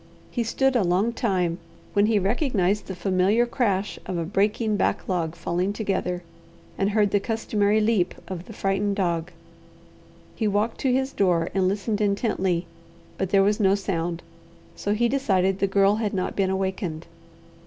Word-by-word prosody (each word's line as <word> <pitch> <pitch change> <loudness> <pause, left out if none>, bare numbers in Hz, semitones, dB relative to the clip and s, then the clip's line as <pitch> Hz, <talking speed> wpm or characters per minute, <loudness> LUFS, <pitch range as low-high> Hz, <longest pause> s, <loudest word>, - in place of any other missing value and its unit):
He 240 - -1
stood 265 +4 +1
a 240 - +4
long 190 +6 +1
time, 180 -7 0 0.3
when 205 +1 +4
he 220 -1 +3
recognized 205 - +1
the 190 - -5
familiar 195 +5 +2
crash 205 -5 -1
of 185 - -2
a 165 - -1
breaking 210 +4 +1
backlog 175 -5 -1
falling 180 +3 -1
together, 185 -4 -2 0.5
and 195 - +1
heard 210 -1 +2
the 205 - +3
customary 215 -1 +1
leap 210 -5 +1
of 185 -2 -6
the - - -11
frightened 200 +1 0
dog. 175 -3 -1 1.0
He 220 - 0
walked 210 +3 0
to 265 - +1
his 265 +1 +1
door 175 -4 +2
and 190 -1 +2
listened 205 +2 -1
intently, 195 -4 0 0.5
but 190 - -1
there 195 0 +4
was 205 +2 +2
no 195 -2 +4
sound; 175 -3 -3 0.5
so 205 +1 -1
he 240 +2 +2
decided 195 -8 +1
the 200 - +2
Girl 195 +1 +3
had 215 -3 -2
not 185 - -2
been 195 -2 +1
awakened. 190 -4 -2
200 Hz, 165 wpm, -25 LUFS, 185-215 Hz, 1.0 s, a